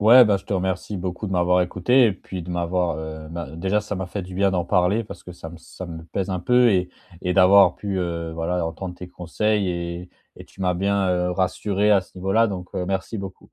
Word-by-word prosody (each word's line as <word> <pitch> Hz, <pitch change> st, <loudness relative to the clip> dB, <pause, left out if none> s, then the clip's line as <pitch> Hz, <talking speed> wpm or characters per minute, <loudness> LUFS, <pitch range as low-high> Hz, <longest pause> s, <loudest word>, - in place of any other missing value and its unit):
Ouais, 120 Hz, +4 st, +8 dB
bah, 105 Hz, -2 st, +3 dB
je 95 Hz, -, -10 dB
te -, -, -5 dB
remercie 95 Hz, +1 st, -2 dB
beaucoup 90 Hz, +3 st, -4 dB
de -, -, -4 dB
m'avoir 90 Hz, 0 st, +3 dB
écouté 120 Hz, +9 st, +3 dB
et 105 Hz, -, +2 dB
puis 95 Hz, -1 st, -8 dB
de 90 Hz, -, -8 dB
m'avoir, 90 Hz, -1 st, 0 dB
heu, 80 Hz, 0 st, -7 dB
ben 85 Hz, -3 st, -6 dB
déjà, 95 Hz, +4 st, +1 dB
ça 105 Hz, 0 st, -5 dB
m'a 95 Hz, -1 st, -4 dB
fait 95 Hz, +2 st, -5 dB
du 90 Hz, 0 st, -9 dB
bien 100 Hz, +1 st, +2 dB
d'en 90 Hz, -2 st, 0 dB
parler, 95 Hz, +5 st, +2 dB
parce -, -, -10 dB
que 90 Hz, -, -11 dB
ça 80 Hz, -2 st, -9 dB
me 85 Hz, -, -11 dB
ça 95 Hz, +2 st, -10 dB
me 80 Hz, -1 st, -8 dB
pèse 95 Hz, +3 st, -3 dB
un 90 Hz, -1 st, -2 dB
peu 125 Hz, +2 st, +4 dB
et 90 Hz, -2 st, +1 dB, 0.3 s
et 90 Hz, -, -1 dB
d'avoir 95 Hz, +1 st, +6 dB
pu, 100 Hz, -2 st, -3 dB
heu, 85 Hz, -2 st, -3 dB
voilà 85 Hz, +1 st, -1 dB
entendre 90 Hz, +2 st, -6 dB
tes 90 Hz, -, -8 dB
conseils 100 Hz, +3 st, -1 dB
et 85 Hz, 0 st, -4 dB, 0.3 s
et -, -, -11 dB
tu 95 Hz, -, -18 dB
m'as 90 Hz, -1 st, +1 dB
bien, 100 Hz, +1 st, +1 dB
heu, 90 Hz, 0 st, +1 dB
rassuré 100 Hz, +3 st, 0 dB
à 100 Hz, -, +5 dB
ce 90 Hz, 0 st, -14 dB
niveau-là. 105 Hz, +5 st, +2 dB
Donc, 90 Hz, -2 st, -5 dB
heu, 90 Hz, -, -1 dB
merci 95 Hz, +4 st, -3 dB
beaucoup. 95 Hz, -2 st, -9 dB
90 Hz, 245 wpm, -23 LUFS, 90-100 Hz, 0.3 s, Ouais